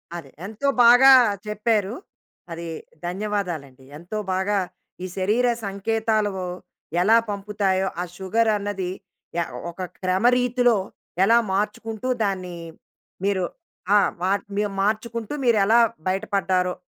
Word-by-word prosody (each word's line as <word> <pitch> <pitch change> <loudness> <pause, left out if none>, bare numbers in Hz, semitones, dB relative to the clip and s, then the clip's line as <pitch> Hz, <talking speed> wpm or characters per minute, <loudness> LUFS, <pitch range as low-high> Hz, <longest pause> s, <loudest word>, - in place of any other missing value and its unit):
అదే 165 -5 -8 0.2
ఎంతో 220 +7 -3 0.2
బాగా 245 +3 +8 0.4
చెప్పారు. 210 0 0 0.6
అది 170 0 -6 0.4
ధన్యవాదాలండి. 175 -8 -3
ఎంతో 175 +7 -6 0.2
బాగా 195 +2 +1 0.4
ఈ - - -3
శరీర 215 +6 +2 0.2
సంకేతాలు 215 +1 0 0.7
ఎలా 220 +5 +5
పంపుతాయో 200 -2 -1
ఆ - - 0
షుగర్ 220 +4 +1
అన్నది 200 -3 -3 0.5
య - - +2 0.3
ఒక 170 - -9 0.2
క్రమరీతిలో 245 +5 +3 0.5
ఎలా 230 +4 +5 0.2
మార్చుకుంటూ 215 +3 -2 0.2
దాన్ని 185 -3 -2 0.7
మీరు 195 -2 +1 0.5
ఆహ్, 205 - +5 0.5
మీ 205 - +1 0.2
మార్చుకుంటూ 220 +3 -2
మీరు 235 -2 +4
ఎలా 225 +4 +5 0.3
బయటపడ్డారో 185 -2 0
205 Hz, 105 wpm, -23 LUFS, 185-225 Hz, 0.7 s, బాగా